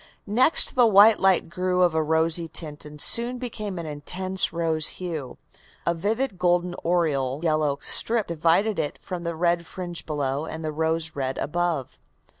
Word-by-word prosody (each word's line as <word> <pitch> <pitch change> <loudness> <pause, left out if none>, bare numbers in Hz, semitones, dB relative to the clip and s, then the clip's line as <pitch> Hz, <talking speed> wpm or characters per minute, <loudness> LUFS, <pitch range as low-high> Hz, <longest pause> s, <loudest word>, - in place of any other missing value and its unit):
Next 250 +9 +3
the 245 -2 +5
white 210 +1 +6
light 190 -2 +3
grew 180 +1 0
of 175 -2 +3
a 160 - +1
rosy 160 +2 +1
tint, 150 -2 -5
and 150 0 -11
soon 235 +9 +3
became 215 -6 -5
an 170 - -5
intense 180 +5 -2
rose 165 -2 +1
hue. 160 -8 -6 0.5
A 170 - +2
vivid 210 +4 -2
golden 175 0 +1
oriole 150 -6 0
yellow 155 -3 +1
strip 225 -2 +2
divided 170 +6 +1
it 145 - -2
from 175 -2 -6
the 170 -1 -3
red 170 0 0
fringe 175 -2 -6
below 145 -1 -2
and 160 0 -6
the 155 - -2
rose 160 +1 -1
red 135 -1 -3
above." 170 -3 -2
170 Hz, 165 wpm, -24 LUFS, 155-185 Hz, 0.5 s, white